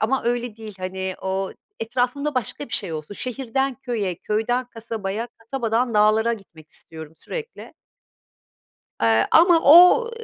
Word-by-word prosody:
ama 255 +5 0
öyle 240 -2 -2
değil, 220 -2 -9
hani, 190 0 -4
o 190 0 -2 0.3
etrafımda 250 +5 -1
başka 255 +3 -3
bir - - -15
şey 165 - -2
olsun. 155 +5 -6
Şehirden 265 +3 -2
köye, 235 -8 -3
köyden 225 +7 -1
kasabaya, 225 -2 -5
kasabadan 230 0 -2
dağlara 215 +2 +3
gitmek 165 -8 -11
istiyorum 160 -1 -10
sürekli 465 - -8 1.3
eee, 115 0 +3
ama 335 0 +6
o, 360 +10 +7
225 Hz, 130 wpm, -22 LUFS, 195-255 Hz, 1.3 s, o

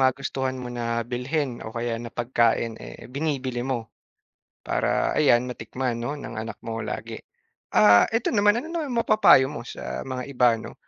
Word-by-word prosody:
magustuhan 130 0 0
mo 125 -1 -6
na 115 -1 -2
bilhin 125 +2 -2
o 110 - -8
kaya 115 -1 -2
na 120 - -6
pagkain 115 -1 0
eh - - -10
binibili 135 -4 -2
mo. 120 -3 -3 0.8
Para - - +1
ayan 125 -4 +4
matikman 125 0 -3
no 120 +4 -3
ng 145 -6 -8
anak 110 -1 -6
mo 115 -1 -4
lagi. - - -5 0.5
Ah 105 -1 +6
eto 225 +1 0
naman 205 0 +4
ano 320 +7 -5
naman 320 -4 -3
mapapayo 215 - +6
mo 150 - -6
sa 65 0 -6
mga 130 -1 -4
iba 125 -2 +4
'no, - - -9
125 Hz, 165 wpm, -25 LUFS, 115-135 Hz, 0.8 s, Ah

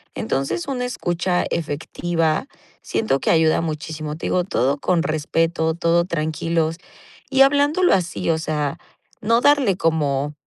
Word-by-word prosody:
Entonces, 135 +5 -2
una 250 -2 -2
escucha 175 -6 -1
efectiva. 165 - -1 0.3
Siento 175 -12 0
que - - -2
ayuda 160 0 +3
muchísimo. 155 -1 -4
Te - - -4
digo 180 - +1
todo 135 -3 0
con 170 +3 +1
respeto, 160 +1 0
todo 170 0 +2
tranquilos, 165 0 -1 0.5
y 270 0 +3
hablándolo 290 +6 +4
así, 175 -3 -1
o 160 - +1
sea, 150 -3 -2 0.4
no 230 +3 +2
darle 280 -9 +4
como 150 -4 0
165 Hz, 130 wpm, -21 LUFS, 155-185 Hz, 0.5 s, hablándolo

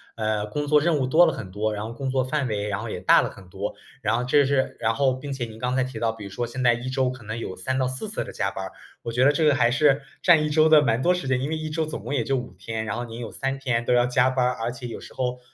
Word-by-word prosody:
呃， 110 -2 -1
工 145 +8 -3
作 150 0 +4
任 165 -1 +2
务 130 -2 0
多 160 +7 +6
了 160 - +3
很 95 - -7
多， 105 +2 -1
然 105 0 -4
后 115 - -6
工 135 +2 -4
作 130 0 +2
范 135 +2 -1
围 105 -1 -2
然 100 0 -2
后 115 - -5
也 90 - -4
大 90 - +5
了 - - -2
很 95 -2 -14
多。 90 - -5 0.3
然 115 - +1
后 125 - -2
这 140 +3 +4
是 135 -1 0
然 110 0 +2
后 130 +2 +2
并 135 +2 -6
且 135 -3 -3
您 110 -1 -11
刚 125 +2 -2
才 130 -1 +1
提 130 -3 -7
到 115 0 +1
比 110 -2 -10
如 - - -7
说 120 +5 -3
现 125 +2 -6
在 120 -1 +5
一 120 +2 -4
周 130 -1 +1
可 130 -2 -8
能 110 +2 -5
有 95 -5 -5
3 130 0 -2
到 130 - +1
4 130 +12 -5
次 215 - -3
的 - - -9
加 95 - -1
班 95 -1 -5
儿， - - -9 0.3
我 115 - -5
觉 125 +2 +3
得 145 - +6
这 155 +2 +1
个 150 -2 +5
还 120 -3 +3
是 145 +1 +3 0.2
占 165 -4 +5
一 - - -1
周 155 +1 +4
的 155 -1 +7
蛮 115 -2 +1
多 180 +6 +4
时 180 -7 -3
间， 130 -1 +2
因 140 - -2
为 160 - -1
一 155 0 -4
周 160 +1 -1
总 155 -9 -6
共 120 +5 -4
也 120 -5 0
就 135 - +1
5 125 -1 -4
天， 110 -1 -4
然 110 0 -3
后 120 - -3
你 115 0 -8
有 115 -2 -6
3 135 0 -3
天 125 -4 -1
都 - - +2
要 120 0 +4
加 125 +1 +3
班 130 -1 +1
儿， 125 - +2
而 115 - -1
且 120 0 -7
有 115 - -7
时 - - -12
候 125 -1 -2
125 Hz, 350 characters per minute, -24 LUFS, 115-140 Hz, 0.3 s, 的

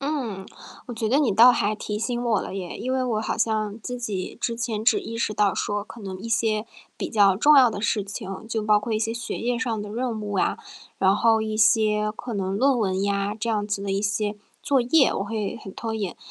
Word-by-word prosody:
嗯， 260 -10 -3 0.4
我 245 - -6
觉 225 -1 -2
得 265 +5 +3
你 275 -8 +2
倒 235 +5 +8
还 210 -2 0
提 210 0 -4
醒 240 +2 -2
我 230 -4 +1
了 - - -6
耶， 185 -3 -5
因 255 +3 -3
为 260 - +1
我 225 -4 0
好 220 - -2
像 215 -2 0
自 250 +4 -5
己 205 -6 -4
之 235 - -1
前 225 -2 -3
只 415 - +4
意 230 - -6
识 230 -2 -1
到 205 -2 +2
说 205 0 -2
可 230 - -12
能 190 -2 -6
一 225 +5 -7
些 220 -1 0 0.3
比 - - -3
较 200 -4 +4
重 295 +8 +6
要 255 -3 +7
的 205 - -5
事 210 -1 0
情， 195 0 -7
就 225 -1 -2
包 210 0 +4
括 225 +2 -4
一 215 - +1
些 225 +1 -1
学 235 - -5
业 240 0 -1
上 230 -4 -2
的 210 - -6
任 230 +1 -3
务 205 -1 -4
啊， - - +1 0.4
然 190 0 +4
后 225 +1 +3
一 215 0 -2
些 215 -1 +3
可 240 - -6
能 195 -1 -2
论 265 +4 +3
文 190 -4 0
呀， 200 0 0
这 235 +2 -3
样 210 -2 0
子 205 -1 -2
的 200 - -3
一 195 +1 -1
些 210 0 -1 0.3
作 275 -2 +2
业， 265 +3 +3
我 - - -1
会 210 +1 -3
很 195 - -9
拖 225 +2 -4
延。 200 -5 -3
215 Hz, 260 characters per minute, -24 LUFS, 205-235 Hz, 0.4 s, 倒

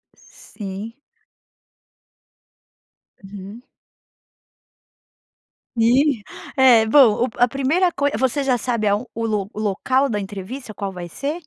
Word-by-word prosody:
Sim. 205 +3 -9 2.3
Uhum. 200 +3 -10 2.2
E. 245 0 +3 0.3
É, 245 -4 +6
bom, 245 -2 +5
o - - -3
a 245 0 +4
primeira 295 +8 +1
coi 285 -1 0
você 260 +3 0
já 255 -2 +1
sabe 230 -2 -1
aon 205 +5 +1
o 230 0 -3
lo 205 -3 -1
o 215 - -7
local 255 +7 0
da 210 -2 -1
entrevista 205 +5 -7
qual 200 -1 -5
vai 175 -2 -7
ser? 295 - -5
230 Hz, 115 wpm, -21 LUFS, 205-265 Hz, 2.3 s, É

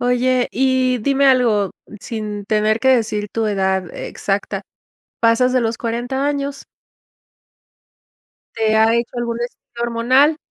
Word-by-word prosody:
Oye, 250 0 +1
y 255 -1 +2
dime 275 +4 +2
algo, 235 -7 +3 0.3
sin 210 -3 -5
tener 215 +1 +1
que 265 - +1
decir 220 -5 +1
tu 225 -1 -1
edad 190 -3 -1
exacta, 200 0 -3 0.6
¿pasas 235 +2 +3
de 255 - +3
los 225 0 -1
40 245 +4 -2
años? 280 -1 -3 1.9
¿Te 220 -1 +1
ha 220 +1 +4
hecho 235 +1 -2
algún 235 -1 -2
estudio 240 0 -7
hormonal? 255 +6 +3
235 Hz, 125 wpm, -19 LUFS, 220-255 Hz, 1.9 s, ha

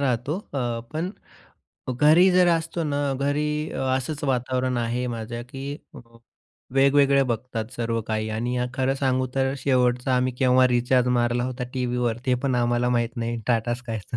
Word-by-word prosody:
राहतो. 135 +4 0
अ, 120 -4 -2
पण 165 +4 -2 0.9
घरी 160 +5 +6
जर 180 -1 +5
असतो 165 0 0
ना 145 -1 -1
घरी 150 +2 -1
अ, - - -5 0.2
असंच 140 +3 -4
वातावरण 130 -1 0
आहे 120 +2 -1
माझ्या, 120 0 -5
की 135 +3 -7 1.0
वेगवेगळे 140 0 +4
बघतात 120 -2 -3
सर्व 115 -1 -1
काही 110 0 -2
आणि 120 +3 -2 0.2
खरं 130 +1 +1
सांगू 130 -1 0
तर 135 0 +1
शेवटचा 125 -1 +1
आम्ही 125 0 +1
केव्हा 130 0 +5
रिचार्ज 125 +1 +2
मारला 120 0 +1
होता 125 0 -4
टीव्हीवर 125 -2 -1
ते 125 - +3
पण 135 -2 +1
आम्हाला 120 0 +1
माहीत 120 -1 0
नाही 115 0 -3
टाटा 120 0 +1
स्कायचं. 120 -2 -6
125 Hz, 155 wpm, -24 LUFS, 120-140 Hz, 1.0 s, घरी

